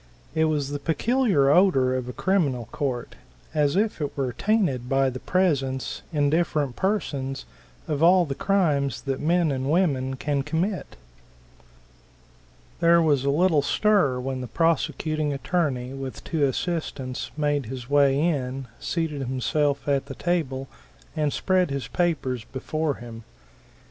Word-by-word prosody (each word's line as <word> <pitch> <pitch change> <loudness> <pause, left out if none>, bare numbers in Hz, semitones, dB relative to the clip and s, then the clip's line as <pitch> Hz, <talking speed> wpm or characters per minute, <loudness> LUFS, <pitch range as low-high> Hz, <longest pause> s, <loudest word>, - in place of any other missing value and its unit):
It 160 0 +2
was 150 -3 0
the 145 0 -3
peculiar 165 - +2
odor 145 -7 +4
of 125 -1 -3
a - - -3
criminal 140 -8 0
court, 130 -4 -3 0.4
as 150 0 +2
if 210 -3 0
it 145 - -3
were 130 -3 -1
tainted 175 - 0
by 135 -1 +2
the 130 - -6
presence, 135 -9 0
in 145 -3 +1
different 150 -5 0
persons, 140 -9 -2 0.4
of 150 -2 -2
all 175 +1 +6
the 140 - -3
crimes 145 - +1
that 135 -2 -2
men 165 0 +2
and 130 0 -2
women 140 -6 +1
can 140 +1 -1
commit. 165 +7 -2 1.8
There 170 0 +5
was 150 -5 +2
a - - +2
little 160 +1 +3
stir 155 -5 +2
when 130 0 -3
the 125 - -5
Prosecuting 155 -1 0
Attorney, 135 -4 -1
with 135 -1 -7
two 155 -4 0
assistants, 135 -3 -3
made 145 -4 0
his 125 0 -6
way 140 -1 +4
in, 135 -5 -1
seated 160 -4 -2
himself 140 +3 0
at 140 -1 +1
the 135 - -7
table, 135 -7 -1 0.5
and 150 -2 +1
spread 185 +1 +1
his 140 -1 -3
papers 135 -9 -1
before 155 +2 -2
him. 115 -1 -10
145 Hz, 145 wpm, -25 LUFS, 135-165 Hz, 1.8 s, all